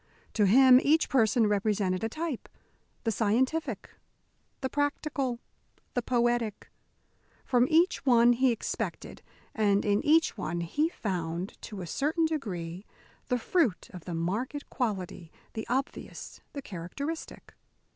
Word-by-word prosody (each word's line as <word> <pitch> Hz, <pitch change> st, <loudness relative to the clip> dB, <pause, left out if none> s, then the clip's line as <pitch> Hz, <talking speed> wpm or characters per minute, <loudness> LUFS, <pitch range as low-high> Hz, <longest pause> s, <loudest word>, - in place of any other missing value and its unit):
To 210 Hz, -, +3 dB
him 255 Hz, +4 st, +8 dB
each 315 Hz, +3 st, +3 dB
person 230 Hz, -3 st, +3 dB
represented 200 Hz, -2 st, 0 dB
a 225 Hz, -, 0 dB
type 310 Hz, -1 st, -4 dB, 0.5 s
the 225 Hz, -, +1 dB
scientific, 250 Hz, +4 st, 0 dB, 0.7 s
the 265 Hz, -, 0 dB
practical, 285 Hz, -2 st, -1 dB, 0.6 s
the 245 Hz, -, 0 dB
poetic. 240 Hz, -3 st, 0 dB, 0.7 s
From 245 Hz, -1 st, +3 dB
each 335 Hz, +4 st, +3 dB
one 240 Hz, -2 st, +5 dB
he 255 Hz, +1 st, +3 dB
expected, 230 Hz, -, -4 dB, 0.3 s
and 205 Hz, -2 st, +2 dB
in 205 Hz, 0 st, +2 dB
each 320 Hz, +2 st, +4 dB
one 170 Hz, -1 st, -2 dB
he 295 Hz, -, 0 dB
found, 180 Hz, -, -4 dB
to 205 Hz, -3 st, -7 dB
a -, -, -5 dB
certain 305 Hz, -, 0 dB
degree, 190 Hz, -, -4 dB, 0.4 s
the 250 Hz, -, +1 dB
fruit 245 Hz, -, 0 dB
of 180 Hz, -3 st, -10 dB
the 175 Hz, -, -4 dB
marked 220 Hz, -, -3 dB
quality, 190 Hz, -, -3 dB, 0.2 s
the 220 Hz, -, -5 dB
obvious, 265 Hz, +3 st, -4 dB
the 280 Hz, -, -6 dB
characteristic. 270 Hz, -, -6 dB
235 Hz, 125 wpm, -29 LUFS, 200-275 Hz, 0.7 s, him